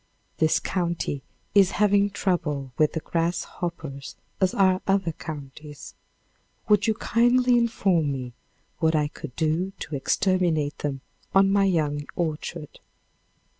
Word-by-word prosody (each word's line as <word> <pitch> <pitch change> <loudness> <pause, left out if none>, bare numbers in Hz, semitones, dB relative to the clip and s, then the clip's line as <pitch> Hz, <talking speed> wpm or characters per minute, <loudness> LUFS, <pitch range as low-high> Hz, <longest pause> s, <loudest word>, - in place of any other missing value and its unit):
This 155 -1 +3
county 170 -6 -2 0.3
is 195 -2 +5
having 205 -1 +4
trouble 150 -9 -1
with 155 -1 +2
the 160 - -2
grasshoppers 165 -4 -3 0.2
as 190 -1 +1
are 190 -1 +3
other 195 -3 +2
counties. 150 -1 -9 0.7
Would 210 0 +4
you 220 - +2
kindly 245 +2 +3
inform 195 -10 +2
me 130 -3 -5 0.5
what 160 0 +2
I 150 -1 +1
could 145 -3 -9
do 165 +4 0
to 155 - -5
exterminate 160 -1 +1
them 135 -2 -3 0.3
on 195 0 +5
my 200 0 +4
young 150 -5 0
orchard? 160 -1 -4
170 Hz, 125 wpm, -25 LUFS, 150-195 Hz, 0.7 s, is